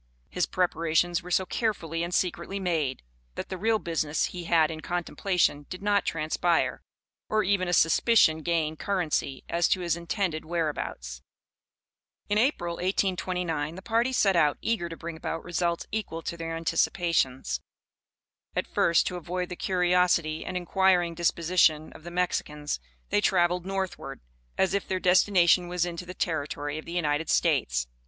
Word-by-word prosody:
His 180 Hz, -, 0 dB
preparations 175 Hz, -1 st, +1 dB
were 180 Hz, -, -10 dB
so 185 Hz, +1 st, +2 dB
carefully 170 Hz, -7 st, -2 dB
and 170 Hz, +1 st, -2 dB
secretly 180 Hz, +2 st, -1 dB
made, 160 Hz, -8 st, -1 dB, 0.3 s
that -, -, -5 dB
the 190 Hz, -, -3 dB
real 220 Hz, +3 st, +2 dB
business 160 Hz, -5 st, -1 dB
he 175 Hz, -1 st, -6 dB
had 165 Hz, -1 st, +3 dB
in 155 Hz, -1 st, -6 dB
contemplation 175 Hz, -3 st, 0 dB
did 185 Hz, +1 st, -7 dB
not 205 Hz, -1 st, +2 dB
transpire, 165 Hz, +2 st, 0 dB, 0.5 s
or 215 Hz, 0 st, +2 dB
even 195 Hz, -1 st, +1 dB
a -, -, -1 dB
suspicion 165 Hz, -1 st, +4 dB
gain 160 Hz, -1 st, 0 dB
currency 155 Hz, -7 st, -1 dB
as 170 Hz, 0 st, +2 dB
to 185 Hz, -, +1 dB
his 170 Hz, -2 st, 0 dB
intended 170 Hz, -1 st, -2 dB
whereabouts. 150 Hz, -, -3 dB, 1.1 s
In 205 Hz, +1 st, +2 dB
April, 175 Hz, -, 0 dB
1829, 180 Hz, -4 st, -1 dB
the 190 Hz, -, -10 dB
party 235 Hz, +4 st, +1 dB
set 200 Hz, -7 st, +3 dB
out, 150 Hz, -4 st, +3 dB
eager 220 Hz, -7 st, -1 dB
to 165 Hz, -, -7 dB
bring 170 Hz, 0 st, -6 dB
about 165 Hz, 0 st, -4 dB
results 170 Hz, -1 st, -1 dB
equal 195 Hz, -7 st, -4 dB
to 170 Hz, -, -4 dB
their 165 Hz, -1 st, -4 dB
anticipations. 145 Hz, -, 0 dB, 0.9 s
At -, -, 0 dB
first, 170 Hz, -, +2 dB
to 180 Hz, -, -2 dB
avoid 180 Hz, +1 st, -4 dB
the 180 Hz, -, -5 dB
curiosity 180 Hz, -4 st, +1 dB
and 185 Hz, -, -4 dB
inquiring 180 Hz, -1 st, +2 dB
disposition 165 Hz, -2 st, +2 dB
of -, -, -13 dB
the 175 Hz, -, -7 dB
Mexicans, 150 Hz, -, -2 dB, 0.3 s
they 105 Hz, -, +3 dB
traveled 180 Hz, -, +2 dB
northward, 195 Hz, -1 st, -4 dB, 0.4 s
as 190 Hz, -, +2 dB
if 200 Hz, -, -1 dB
their 185 Hz, -, -1 dB
destination 180 Hz, -1 st, +4 dB
was 175 Hz, 0 st, 0 dB
into 175 Hz, 0 st, -6 dB
the 180 Hz, -, -7 dB
territory 145 Hz, -2 st, -2 dB
of -, -, -10 dB
the -, -, -8 dB
United 160 Hz, -2 st, 0 dB
States. -, -, +2 dB
175 Hz, 155 wpm, -27 LUFS, 160-185 Hz, 1.1 s, suspicion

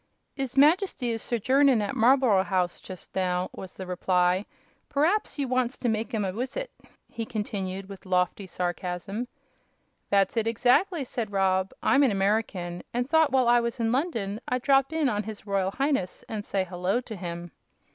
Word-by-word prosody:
"'Is 270 Hz, -1 st, -4 dB
Majesty 300 Hz, -, +3 dB
is 225 Hz, -1 st, -3 dB
sojournin' 260 Hz, +2 st, +3 dB
at 205 Hz, -1 st, -2 dB
Marlb'ro 235 Hz, -4 st, +4 dB
'Ouse, 185 Hz, -2 st, -1 dB
just 185 Hz, -2 st, -10 dB
now," 180 Hz, -1 st, 0 dB
was 190 Hz, -, -9 dB
the 190 Hz, -, -6 dB
reply. 180 Hz, +1 st, +1 dB, 0.4 s
"Per'aps 320 Hz, +10 st, +1 dB
you 280 Hz, -2 st, -1 dB
wants 255 Hz, 0 st, 0 dB
to 245 Hz, -, -2 dB
make 220 Hz, +2 st, -1 dB
'im 215 Hz, -4 st, -1 dB
a 185 Hz, -, -2 dB
wissit," 265 Hz, -, -4 dB, 0.4 s
he 230 Hz, -, -5 dB
continued, 195 Hz, -4 st, -4 dB
with 195 Hz, -1 st, -11 dB
lofty 180 Hz, +1 st, 0 dB
sarcasm. 180 Hz, +5 st, -3 dB, 0.8 s
"That's 200 Hz, +1 st, +2 dB
it, 225 Hz, 0 st, +1 dB
exactly," 255 Hz, -, +2 dB
said 235 Hz, -4 st, -4 dB
Rob. 190 Hz, -1 st, +1 dB
"I'm 280 Hz, -, +4 dB
an 275 Hz, -, +5 dB
American, 195 Hz, -3 st, -1 dB
and 245 Hz, +1 st, -1 dB
thought 320 Hz, 0 st, +4 dB
while 260 Hz, -2 st, +3 dB
I 240 Hz, 0 st, +6 dB
was 235 Hz, 0 st, -3 dB
in 225 Hz, -1 st, +1 dB
London 230 Hz, -, -1 dB
I'd 250 Hz, -1 st, -1 dB
drop 270 Hz, 0 st, +3 dB
in 320 Hz, -3 st, +1 dB
on 210 Hz, -4 st, 0 dB
His 215 Hz, -1 st, -8 dB
Royal 195 Hz, -2 st, 0 dB
Highness 270 Hz, -5 st, -1 dB
and 215 Hz, -2 st, -4 dB
say 195 Hz, -2 st, -1 dB
'hello' 185 Hz, +5 st, -1 dB
to 230 Hz, -3 st, -8 dB
him." 175 Hz, -2 st, -6 dB
220 Hz, 175 wpm, -27 LUFS, 190-255 Hz, 0.8 s, I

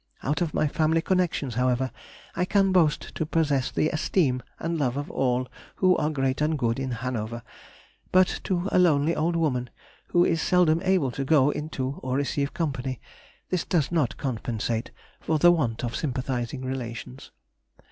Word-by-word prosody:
Out 145 Hz, +4 st, -1 dB
of 170 Hz, -3 st, 0 dB
my 155 Hz, -, +1 dB
family 160 Hz, +2 st, +2 dB
connections, 175 Hz, -8 st, 0 dB
however, 125 Hz, +2 st, +1 dB, 0.4 s
I 180 Hz, -, +1 dB
can 195 Hz, +1 st, +2 dB
boast 165 Hz, -5 st, +2 dB
to -, -, -2 dB
possess 150 Hz, -4 st, +1 dB
the 155 Hz, -, +1 dB
esteem 150 Hz, -5 st, +1 dB, 0.2 s
and 165 Hz, 0 st, -2 dB
love 130 Hz, -2 st, 0 dB
of 145 Hz, -, -4 dB
all 125 Hz, -1 st, 0 dB, 0.3 s
who 185 Hz, -1 st, +4 dB
are 150 Hz, -, +1 dB
great 135 Hz, -2 st, -1 dB
and 155 Hz, +1 st, +1 dB
good 120 Hz, -2 st, 0 dB
in 135 Hz, -1 st, -2 dB
Hanover, 120 Hz, -1 st, -4 dB, 0.7 s
but 185 Hz, 0 st, +3 dB
to 185 Hz, 0 st, 0 dB
a -, -, +4 dB
lonely 160 Hz, -2 st, +3 dB
old 170 Hz, +2 st, 0 dB
woman, 130 Hz, -7 st, 0 dB, 0.4 s
who 175 Hz, 0 st, +3 dB
is 165 Hz, -1 st, +1 dB
seldom 170 Hz, -3 st, +3 dB
able 185 Hz, -9 st, +2 dB
to 135 Hz, -, -3 dB
go 145 Hz, 0 st, +4 dB
into 140 Hz, -3 st, -4 dB
or 130 Hz, 0 st, -2 dB
receive 140 Hz, 0 st, -1 dB
company, 135 Hz, -6 st, -3 dB, 0.5 s
this 180 Hz, -2 st, +1 dB
does 160 Hz, -6 st, 0 dB
not 155 Hz, -8 st, 0 dB
compensate 115 Hz, -3 st, -2 dB, 0.3 s
for 160 Hz, -, 0 dB
the 175 Hz, +3 st, +6 dB
want 125 Hz, -10 st, 0 dB
of 120 Hz, -1 st, -2 dB
sympathising 130 Hz, -2 st, -3 dB
relations. 120 Hz, -, -6 dB
145 Hz, 165 wpm, -26 LUFS, 130-165 Hz, 0.7 s, the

